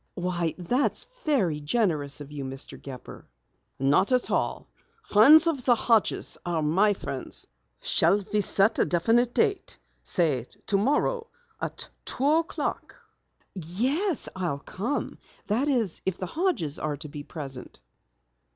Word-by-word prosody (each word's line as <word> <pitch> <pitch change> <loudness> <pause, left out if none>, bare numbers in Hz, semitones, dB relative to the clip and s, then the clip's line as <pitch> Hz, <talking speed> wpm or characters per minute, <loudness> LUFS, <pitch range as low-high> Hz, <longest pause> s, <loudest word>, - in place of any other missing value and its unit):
"Why, 175 -2 -1
that's 245 +10 0 0.2
very 195 - +2
generous 150 -4 0
of 145 0 -9
you, 145 -2 -5
Mr. 135 0 -4
Gepper." 130 -3 -10 0.5
"Not 140 - +3
at 250 -1 +2
all. - - -1 0.4
Friends 295 +10 +7
of 305 -6 0
the 245 -1 +5
Hodges 225 -2 +1
are 170 -3 -1
my 195 +7 +3
friends. 135 -7 -5 0.4
Shall 195 +4 +2
we 210 - +3
set 200 +2 +2
a - - +4
definite 230 +8 +2
date 405 -4 0 0.3
say 145 - 0 0.2
tomorrow 295 - +1 0.3
at - - -5 0.2
two 265 - -3
o'clock?" 325 +2 -1 0.6
"Yes, 250 - 0
I'll 175 -7 -2
come. 235 - -4 0.3
That 235 +8 0
is, 235 - 0
if 190 -1 -2
the 185 - -4
Hodges 245 - -1
are 150 -1 -2
to 150 +2 -8
be 145 0 -8
present." 140 -4 -7
190 Hz, 135 wpm, -27 LUFS, 155-250 Hz, 0.6 s, Friends